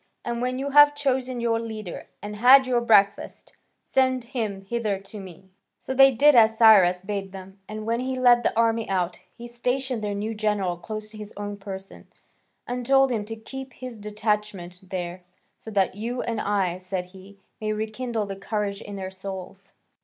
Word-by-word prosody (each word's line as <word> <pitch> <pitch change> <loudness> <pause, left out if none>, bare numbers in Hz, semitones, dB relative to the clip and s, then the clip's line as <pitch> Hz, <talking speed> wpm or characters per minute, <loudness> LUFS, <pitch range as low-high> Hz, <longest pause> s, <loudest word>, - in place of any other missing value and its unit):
And 235 0 -3
when 255 +1 -1
you 280 +2 -3
have 290 +1 +7
chosen 260 -3 -1
your 230 -1 +1
leader, 215 -5 -7 0.2
and 210 0 -6
had 260 +4 +7
your 245 -2 +1
breakfast, 205 -4 +2 0.3
send 260 -1 +1
him 225 -5 -4
hither 215 -2 -1
to 195 +2 -9
me." 190 0 -12 0.3
So 265 - -5
they 270 +1 +7
did 290 +5 +5
as 225 -2 +5
Cyrus 190 -6 +6
bade 195 -1 -4
them, 190 0 -11
and 215 0 -6
when 230 +1 0
he 260 +1 -2
led 245 -1 +5
the 225 - -1
army 230 -1 +2
out, 180 -2 -1 0.2
he 240 - -8
stationed 250 0 -2
their 205 -1 -2
new 215 +2 -3
general 210 -4 0
close 215 +4 -7
to 215 - -11
his 210 0 -9
own 205 0 -4
person, 195 -1 -9 0.6
and 245 0 -4
told 270 +1 +4
him 215 -3 -1
to 225 +1 -6
keep 265 +3 -9
his 250 -3 -8
detachment 210 -4 -3
there, 180 -1 -4 0.4
"So - - -10
that 195 -3 +1
you 235 +5 -4
and 230 -2 -2
I," 190 -3 0
said 185 0 -4
he, 195 +1 -14 0.2
"may 215 0 -1
rekindle 220 +1 -3
the 195 -1 -6
courage 200 0 -3
in 205 - -8
their 190 -1 -5
souls." 190 0 -9
215 Hz, 185 wpm, -25 LUFS, 195-240 Hz, 0.6 s, have